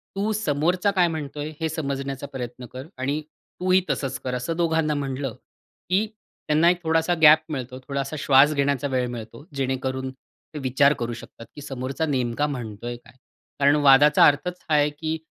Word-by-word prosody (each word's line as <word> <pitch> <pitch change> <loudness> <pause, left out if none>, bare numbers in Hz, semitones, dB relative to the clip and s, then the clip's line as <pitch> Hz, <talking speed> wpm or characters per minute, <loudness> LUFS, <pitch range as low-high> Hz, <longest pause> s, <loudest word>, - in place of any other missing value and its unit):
तू 205 +3 0
समोरचा 180 0 +1
काय 185 -3 +3
म्हणतोय 150 -2 -5
हे 160 -1 -1
समजण्याचा 140 -3 -4
प्रयत्न 125 -2 -7
कर 130 +4 -7
आणि 140 +4 -1 0.4
तूही 185 +1 +3
तसंच 130 -2 -2
कर." 125 -1 -2
असं 125 +7 -3
दोघांना 160 -2 +1
म्हटलं, 135 -3 -3 0.5
की 190 +4 +2 0.4
त्यांना 155 +3 +4
एक 175 0 0
थोडासा 165 +2 +2
गॅप 155 0 +8
मिळतो, 130 -3 -5
थोडासा 140 +1 -3
श्वास 140 +2 +5
घेण्याचा 140 -1 0
वेळ 130 -2 0
मिळतो, 115 +2 -8
जेणेकरून 130 0 -2 0.4
ते 150 - -5
विचार 140 +2 +3
करू 120 0 -2
शकतात, 115 0 -11
की 145 - -9
समोरचा 135 +2 -3
नेमका 130 -1 0
म्हणतोय 120 -3 -5
काय? 120 - -20 0.5
कारण 140 +1 +5
वादाचा 145 0 +6
अर्थच 175 +5 0
हा 155 - +3
आहे, 145 0 +4
की 155 +2 -4
145 Hz, 165 wpm, -24 LUFS, 130-160 Hz, 0.5 s, गॅप